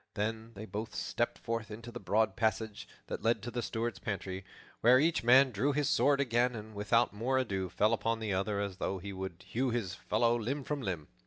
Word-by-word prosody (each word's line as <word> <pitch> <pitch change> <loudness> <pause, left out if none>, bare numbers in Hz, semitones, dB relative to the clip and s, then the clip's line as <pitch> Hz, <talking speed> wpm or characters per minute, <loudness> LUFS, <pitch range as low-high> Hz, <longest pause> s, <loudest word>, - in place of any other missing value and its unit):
Then 110 +2 -3
they 105 +2 -7
both 110 +3 -5
stepped 120 - -1
forth 115 -1 -3
into 115 +3 -8
the - - -6
broad 110 -2 +1
passage 110 -1 -1 0.2
that - - -5
led 115 -2 +1
to 120 - -4
the 120 +1 -2
Steward's 115 0 -2
pantry, 95 -2 -4 0.4
where 125 +3 +6
each 160 -1 +2
man 130 +2 +7
drew 130 +7 +1
his 145 -1 +1
sword 140 -1 +4
again 125 -2 +2
and 110 0 -8
without 105 +3 +2
more 120 +6 0
ado 95 -8 -1
fell 105 +6 +2
upon 115 0 0
the 110 -3 -2
other 100 +2 0
as 100 -2 -3
though 95 0 -2
he 100 +2 -6
would 95 -2 -6
hew 130 +3 0
his 115 -6 -2
fellow 115 +4 +1
limb 130 +5 -2
from 145 +1 -3
limb. 90 - -3
110 Hz, 215 wpm, -32 LUFS, 100-120 Hz, 0.4 s, man